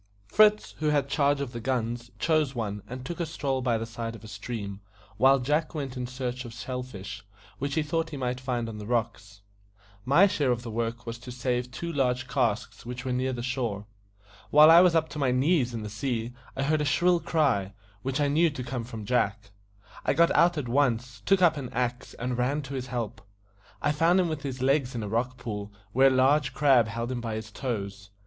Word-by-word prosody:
Fritz, 210 - +4
who 155 - 0
had 145 -2 +2
charge 140 0 +2
of 135 -3 -3
the 120 - -6
guns, 120 -1 -2
chose 155 -4 +1
one, 105 -3 -3
and 125 +1 -7
took 170 +4 -5
a 170 - 0
stroll 135 -4 -2
by 120 -3 +1
the 110 - -3
side 115 0 -5
of 115 - -13
a - - -9
stream, 105 -3 -6 0.4
while 135 +1 +6
Jack 150 +5 0
went 135 -4 -4
in 125 -1 -3
search 125 0 -4
of 115 -2 -9
shell 125 +1 -4
fish, 100 -8 -8 0.4
which 140 +2 -2
he 160 - +2
thought 165 +2 -1
he 150 - -6
might 125 -1 -2
find 125 -3 -2
on 110 -2 -7
the 105 - -7
rocks. 110 -4 -2 0.6
My 145 - +6
share 155 -9 +1
of 120 -1 0
the 115 - -6
work 115 +1 -3
was 115 0 -6
to 125 +1 -9
save 125 0 -1
two 170 +7 -5
large 125 -3 0
casks 125 -4 -1
which 125 +2 -6
were 130 - -1
near 130 +1 0
the 120 -2 -4
shore. 120 -5 -2 0.6
While 150 +2 +8
I 170 +1 +9
was 180 -2 +5
up 160 -1 +3
to 150 - -6
my 135 -3 +2
knees 130 +1 +2
in 115 -2 -5
the - - -4
sea 115 +2 -3 0.2
I 135 - -1
heard 155 +2 +1
a - - +1
shrill 175 +4 +3
cry, 130 - +1 0.3
which 135 +4 -2
I 145 - +3
knew 160 +4 +3
to 140 -4 -6
come 120 -1 -4
from 115 -3 -7
Jack. 110 -2 0 0.5
I - - +2
got 170 0 +5
out 170 +1 +4
at 140 -4 -2
once, 120 -3 0
took 195 -1 +4
up 160 -3 +5
an 130 -4 -5
axe, 125 +1 -2
and 125 0 -3
ran 140 +4 0
to 135 0 -7
his 130 -1 -4
help. 115 -5 -4 0.6
I 145 - +3
found 165 +5 +3
him 180 -2 +2
with 155 -2 -3
his 130 -2 -4
legs 135 -2 +2
in 115 - -3
a - - -4
rock 120 +4 -1
pool, 105 -4 -5 0.2
where 130 +5 +5
a - - +7
large 135 +2 +3
crab 135 -6 +5
held 115 +3 -3
him 125 -2 -3
by 115 -2 -3
his 110 0 -6
toes. 100 -5 -4
125 Hz, 225 wpm, -27 LUFS, 115-145 Hz, 0.6 s, I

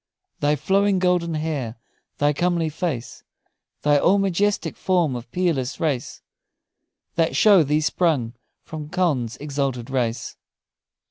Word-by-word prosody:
"Thy 145 +1 +2
flowing 195 +6 +2
golden 180 -3 +1
hair, 150 -7 -3 0.4
thy 145 0 +2
comely 170 +1 0
face, 150 -6 -4 0.6
Thy 145 -1 +4
all 190 +7 +4
majestic 195 +1 0
form 175 -8 +1
of 120 0 -8
peerless 150 -7 -1
grace, 145 -7 -2 0.9
That 165 -1 +1
show 205 -4 +6
thee 150 +1 +1
sprung 150 -8 +1 0.3
from 155 -2 -7
Conn's 150 -11 0
exalted 135 -4 -3
race." 120 -3 -2
155 Hz, 120 wpm, -23 LUFS, 135-180 Hz, 0.9 s, show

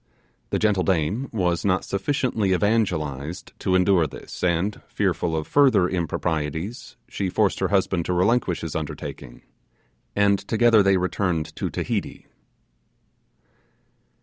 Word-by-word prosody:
The - - 0
gentle 105 -3 +2
dame 95 - 0
was 90 -5 0
not 95 -2 +1
sufficiently 110 -3 0
evangelical 85 - 0 0.3
to 95 - +1
endure 90 -3 +3
this, - - -10
and, 90 +3 0
fearful 85 -2 -1
of 80 - -2
further 130 -11 +4
improprieties, 80 +2 -3
she 95 - -3
forced - - +1
her - - +1
husband 95 -3 +1
to 90 - -1
relinquish 95 0 +1
his 80 -1 -5
undertaking, 75 -5 -6 0.7
and 100 -1 +3
together 115 +1 +4
they 100 -1 +4
returned 90 -3 -1
to - - -3
Tahiti. - - -3
95 Hz, 120 wpm, -24 LUFS, 85-105 Hz, 0.7 s, further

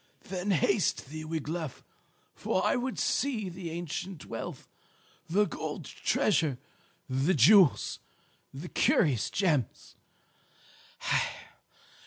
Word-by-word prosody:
Then 185 +1 -3
haste 195 -4 +1
thee, 155 0 -6
Wiglaf, 160 -2 -4 0.5
for - - -1
I - - +3
would 255 +1 -2
see 230 -8 0
the 175 -1 -6
ancient 170 +1 -5
wealth, - - -6 0.6
the 205 +5 +3
gold - - -5
treasure, 160 -10 +1 0.5
the 135 +8 +1
jewels, 170 - +5 0.5
the 150 +6 -8
curious 130 -9 +2
gems. 155 - -1
170 Hz, 95 wpm, -30 LUFS, 150-195 Hz, 0.6 s, jewels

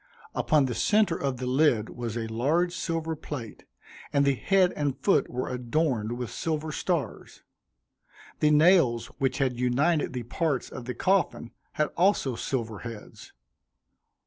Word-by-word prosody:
Upon 150 -3 +2
the 125 - -2
centre 210 - +2
of 135 -4 -2
the 130 - -4
lid 125 -4 +2
was 120 -2 -5
a 115 - -2
large 145 +11 0
silver 165 -2 -2
plate, 140 -7 -8 0.5
and 140 0 +3
the 140 - +4
head 185 +6 +2
and 145 -3 -1
foot 135 - +2
were 125 +1 -3
adorned 125 -2 -1
with 125 -2 -5
silver 155 +3 -3
stars. 165 -1 -3 1.0
The 150 - +4
nails 150 -7 +4
which 135 -1 0
had 130 -4 0
united 140 +5 +1
the 125 -1 -4
parts 140 +3 -1
of 120 - -8
the 125 -1 -4
coffin 185 -8 0 0.2
had 150 - 0
also 175 -7 +2
silver 115 -4 -3
heads. 115 -3 -10
135 Hz, 145 wpm, -27 LUFS, 120-160 Hz, 1.0 s, the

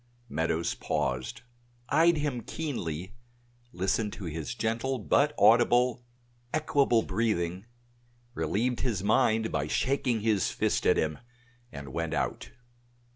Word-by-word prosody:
Meadows 80 +2 -1
paused, 65 - -3 0.5
eyed 165 +3 +4
him 145 -5 -2
keenly, 105 - -4 0.6
listened 100 +4 0
to 100 - -8
his 80 +4 -4
gentle 120 +3 -1
but 140 +6 +2
audible, 120 +3 +4 0.5
equable 140 -6 +2
breathing, 95 -2 -1 0.7
relieved 110 +10 -1
his 110 -7 -1
mind 110 +2 +2
by 75 -1 -1
shaking 125 - 0
his 105 -3 +1
fist - - 0
at - - +4
him, 75 -1 -1 0.5
and 70 -2 -8
went 85 -1 -2
out. - - -2
110 Hz, 115 wpm, -29 LUFS, 85-125 Hz, 0.7 s, eyed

